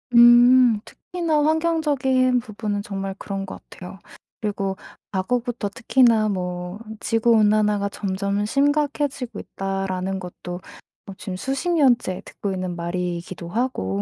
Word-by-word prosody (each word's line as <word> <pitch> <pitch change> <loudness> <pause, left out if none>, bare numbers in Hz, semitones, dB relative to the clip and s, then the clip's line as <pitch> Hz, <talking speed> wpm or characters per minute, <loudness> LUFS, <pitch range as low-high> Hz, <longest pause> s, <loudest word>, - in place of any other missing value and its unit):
음 240 -1 +7
특히나 330 -4 -1
환경적인 290 -6 +2
부분은 215 -3 -4
정말 195 -1 -4
그런 195 -1 -4
것 190 - -9
같아요. 185 +1 -10 0.4
그리고 200 -2 -2 0.4
과거부터 235 +2 -1
특히나 230 -1 +3
뭐 180 0 -4 0.2
'지구 225 +1 +1
온난화가 210 -2 +3
점점 200 +1 -2
심각해지고 285 0 0
있다.'라는 195 -1 -3
것도 180 0 -7 0.5
어 195 - -7
지금 190 - -6
수십 270 - -2
년째 255 - +2
듣고 200 - -5
있는 185 -1 -3
말이기도 175 0 -4
하고 170 - -1
210 Hz, 285 characters per minute, -23 LUFS, 190-255 Hz, 0.5 s, 음